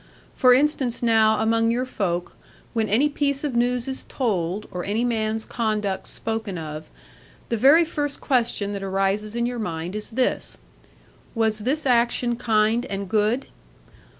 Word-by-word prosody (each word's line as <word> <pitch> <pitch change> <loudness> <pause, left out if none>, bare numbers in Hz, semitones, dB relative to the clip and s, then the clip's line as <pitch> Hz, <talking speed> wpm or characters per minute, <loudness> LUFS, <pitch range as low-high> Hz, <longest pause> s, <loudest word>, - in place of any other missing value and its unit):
For 255 - +5
instance 260 -2 +2
now, 220 -2 +4
among 225 +1 +2
your 245 +2 0
folk, 180 -8 -3 0.4
when 220 -3 0
any 240 +9 +4
piece 285 -1 -1
of 285 -5 -2
news 245 +1 +1
is 265 0 -4
told, 200 -5 -1
or 180 -1 -4
any 220 +4 0
man's 220 -2 -1
conduct 210 -4 -2
spoken 220 -4 -4
of, 155 -1 -7 0.6
the 235 - +1
very 285 +9 +6
first 290 -3 -3
question 230 -6 0
that 200 - -4
arises 195 +3 -1
in 235 0 0
your 245 0 -3
mind 175 -2 -4
is 215 - -4
this 250 +2 -1 0.8
"Was 220 -1 +1
this 270 +8 -1
action 240 -1 +2
kind 225 0 +2
and 200 0 -4
good?" 220 +5 +1
225 Hz, 150 wpm, -23 LUFS, 205-245 Hz, 0.8 s, very